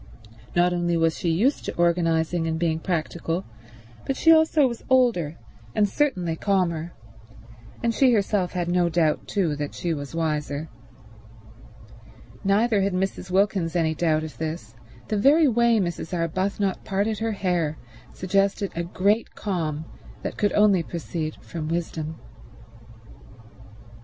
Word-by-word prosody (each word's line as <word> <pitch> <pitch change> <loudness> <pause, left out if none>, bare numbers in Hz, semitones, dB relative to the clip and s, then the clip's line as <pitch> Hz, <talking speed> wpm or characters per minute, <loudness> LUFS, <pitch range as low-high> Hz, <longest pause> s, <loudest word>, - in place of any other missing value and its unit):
Not 175 +1 +3
only 175 -1 0
was 165 -1 +2
she 170 - -2
used 220 - +1
to - - -4
organizing 170 -1 +1
and 160 0 -1
being 160 -1 0
practical, 170 0 -2 0.6
but 270 - -2
she 325 - +5
also 315 -2 +5
was 235 -2 -6
older, 230 - +2 0.4
and 210 - +3
certainly 185 - 0
calmer; 175 -3 0 0.9
and 230 -1 +2
she 260 +2 +4
herself 200 -4 +1
had 175 -2 -2
no 175 0 +2
doubt 160 -2 +1
too 175 -7 0
that 145 -1 -4
she 170 -2 -2
was 145 0 -6
wiser. 150 -1 -2 1.7
Neither 205 +2 +3
had 195 0 0
Mrs. 185 0 -2
Wilkins 190 -3 +1
any 160 -2 +2
doubt 155 -1 +1
of 155 - -8
this; 160 +2 -5 0.3
the 215 - -1
very 290 +8 +5
way 235 -1 +3
Mrs. 175 -3 -2
Arbuthnot 185 +3 -1
parted 205 +2 -1
her 225 0 -1
hair 175 -6 -1 0.3
suggested 195 +1 0
a 170 - -1
great 200 +6 0
calm 160 -6 -3 0.4
that - - -4
could 205 - +1
only 205 -4 +4
proceed 165 -1 -4
from 160 -3 -6
wisdom. 160 -1 -3
175 Hz, 135 wpm, -24 LUFS, 165-205 Hz, 1.7 s, she